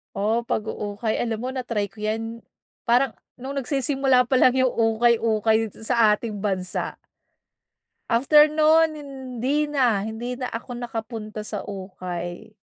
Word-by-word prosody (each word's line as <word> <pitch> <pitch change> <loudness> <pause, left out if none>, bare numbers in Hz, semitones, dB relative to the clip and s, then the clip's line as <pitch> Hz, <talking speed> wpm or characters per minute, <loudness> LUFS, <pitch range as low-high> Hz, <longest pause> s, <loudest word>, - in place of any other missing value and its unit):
Oo, 220 +4 +1
pag-uukay, 215 0 -2
alam 225 -2 -1
mo, 255 - -3
na-try 230 -6 -2
ko 215 - -17
yan. 225 +2 -3 0.5
Parang 250 +3 +4 0.2
nung 270 +2 -6
nagsisimula 270 -1 +2
pa 260 - +3
lang 255 0 +5
yung 260 -1 +3
ukay-ukay 225 -1 +2 0.2
sa 225 -2 +4
ating 210 -1 -6
bansa. 190 -3 -2 1.1
After 295 +6 +6
no'n, 315 +1 +4
hindi 270 +1 -2
na, 250 -8 +2
hindi 220 +4 -4
na 255 - -3
ako 230 +3 -7
nakapunta 225 -2 -5
sa 210 -2 -4
ukay. 185 -2 -6
230 Hz, 130 wpm, -24 LUFS, 215-260 Hz, 1.1 s, After